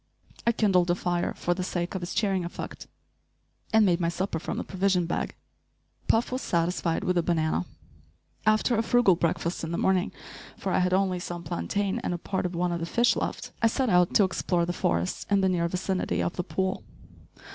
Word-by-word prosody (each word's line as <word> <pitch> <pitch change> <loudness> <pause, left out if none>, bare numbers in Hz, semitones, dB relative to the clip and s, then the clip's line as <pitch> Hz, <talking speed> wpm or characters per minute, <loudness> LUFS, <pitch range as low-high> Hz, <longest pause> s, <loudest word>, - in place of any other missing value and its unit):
I - - +7
kindled 190 -6 +2
a 175 - +3
fire 175 -1 -1
for 175 - 0
the 180 +1 -3
sake 175 -1 -2
of 190 - -3
its 175 - -5
cheering 195 -4 +1
effect, 170 - -7 0.8
and 220 -1 +5
made 175 -2 +3
my 170 -1 +1
supper 170 -1 -2
from - - -4
the - - -2
provision 190 -2 +1
bag. 170 - -2 0.7
Puff 225 +3 +2
was 255 +1 -2
satisfied 170 -1 0
with 180 -1 +2
a - - +3
banana. 160 - 0 0.8
After 215 +3 +3
a 225 - +2
frugal 230 -5 +4
breakfast 170 +1 -1
in 165 - -3
the 170 - -1
morning 190 0 +2 0.5
for - - -3
I - - +3
had 180 0 +2
only 190 -2 +1
some 175 -1 -6
plantain 190 - -1
and 175 - -2
a - - -3
part 185 +1 -2
of 175 - -7
one 175 +1 0
of 170 - -2
the 165 - -3
fish 240 +6 +3
left - - -3
I 230 - +5
set 250 0 0
out 180 -1 +4
to 210 - +7
explore 180 -2 0
the 175 - -2
forest 85 - -1
in 200 -1 +3
the 190 - +3
near 170 -2 +1
vicinity 180 - -1
of 85 - -2
the 180 - -2
pool. 190 +2 -2
180 Hz, 210 wpm, -27 LUFS, 170-195 Hz, 0.8 s, I